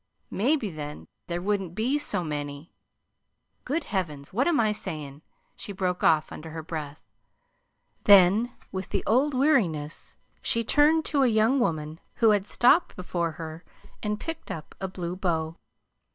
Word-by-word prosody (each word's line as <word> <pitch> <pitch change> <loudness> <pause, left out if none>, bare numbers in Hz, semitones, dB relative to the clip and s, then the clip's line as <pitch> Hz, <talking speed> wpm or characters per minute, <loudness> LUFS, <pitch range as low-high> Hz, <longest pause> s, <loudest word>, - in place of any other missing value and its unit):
Maybe 235 0 +1
then 150 -2 -7 0.2
there 175 0 -3
wouldn't 195 -4 -1
be 250 +7 +1
so 180 - -1
many 145 0 -5 0.9
Good 300 +5 -1
heavens, 155 - -4
what 250 - +2
am 340 -3 +3
I 215 -2 +3
sayin'?" 155 -8 -5 0.3
she - - -5
broke 180 -2 -2
off, 155 -1 +3
under 160 +1 -8
her 160 0 -6
breath. 155 -2 -6 1.0
Then, 200 +4 +6 0.2
with 190 -1 -5
the - - -1
old 265 +5 +2
weariness, 190 - +1 0.3
she 230 - +1
turned 305 +6 +4
to 285 -2 +2
a 265 - +5
young 225 +4 +3
woman 155 -7 -1 0.2
who 225 -2 +5
had 205 -1 +1
stopped 255 - +3
before 175 -4 -2
her 160 +1 -8 0.4
and 210 0 -2
picked 325 0 -5
up 155 - -7
a 190 - -1
blue 180 -1 -5
bow. 165 -4 -1
185 Hz, 150 wpm, -27 LUFS, 160-235 Hz, 1.0 s, Then